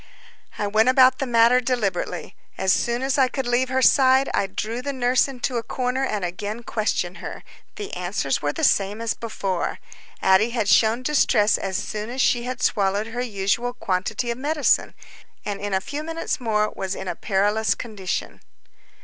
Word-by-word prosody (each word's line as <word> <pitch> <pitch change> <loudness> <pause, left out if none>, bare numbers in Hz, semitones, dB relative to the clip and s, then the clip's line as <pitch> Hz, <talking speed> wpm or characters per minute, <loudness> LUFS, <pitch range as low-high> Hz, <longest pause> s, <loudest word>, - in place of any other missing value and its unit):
I 210 - -1
went 215 +4 +3
about 260 0 +5
the 270 - -2
matter 235 +1 +5
deliberately. 230 -8 -2 0.2
As 190 0 +2
soon 240 +2 0
as 270 +1 0
I 260 - +5
could 265 +1 -4
leave 245 +1 +1
her 260 0 +1
side, 265 0 +5
I 195 - +1
drew 220 +5 -4
the 280 - -3
nurse 250 -1 +2
into 255 -2 -3
a - - 0
corner 255 +2 -2
and 210 -7 -1
again 205 +6 -5
questioned 210 -5 -2
her. - - -7 0.3
The 415 -2 -7
answers 175 -6 -1
were 145 - 0
the - - -5
same 200 +2 +2
as 230 -1 -1
before. 195 -5 -3 0.4
Addie 190 +4 +4
had 215 -3 0
shown 225 +4 +3
distress 245 -7 +3
as 190 -1 -2
soon 210 +1 -4
as 255 +2 -6
she 240 -1 +2
had 250 0 -4
swallowed 200 +1 +1
her 245 - -2
usual 235 +1 -1
quantity 220 +2 -2
of 235 - -5
medicine, 295 +1 +1 0.5
and 200 -1 -4
in 205 0 -3
a - - +2
few 285 +9 -5
minutes 330 +1 -3
more 215 -3 0
was 190 0 -3
in 190 - -7
a - - -1
perilous 205 +2 +1
condition. 205 -6 -5
230 Hz, 185 wpm, -23 LUFS, 200-255 Hz, 0.5 s, about